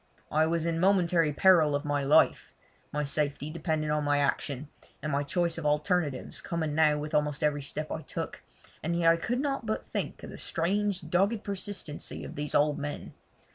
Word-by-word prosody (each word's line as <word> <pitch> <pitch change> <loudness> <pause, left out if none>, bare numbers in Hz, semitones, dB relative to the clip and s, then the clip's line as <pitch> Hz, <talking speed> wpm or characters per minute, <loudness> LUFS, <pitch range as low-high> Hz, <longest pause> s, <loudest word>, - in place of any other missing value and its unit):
I 155 +1 +3
was 165 0 0
in 165 -1 0
momentary 175 -4 +3
peril 160 -2 +5
of 145 +2 -2
my 145 -1 0
life: 140 +2 +3 0.4
my 150 0 -1
safety 145 +1 -1
depended 155 -2 -1
on 150 0 +1
my 145 0 +2
action, 145 0 -1 0.3
and 155 - -3
my 140 +1 +1
choice 170 +3 0
of 160 - -7
alternatives 150 -2 0
coming 160 -3 -2
now 150 -1 +4
with 150 +1 -5
almost 150 0 +1
every 145 -1 +1
step 155 +2 -4
I 160 - -3
took, - - -5 0.4
and 170 +2 -1
yet 165 -1 +5
I - - +4
could 240 +9 -2
not 275 -4 -2
but 215 - -2
think - - -4
of - - -7
the - - -9
strange 190 0 -1
dogged 200 +6 +1
persistency 195 -6 -5
of - - -7
these 145 0 -4
old 150 0 +3
men. 145 0 -5
155 Hz, 190 wpm, -29 LUFS, 150-175 Hz, 0.4 s, peril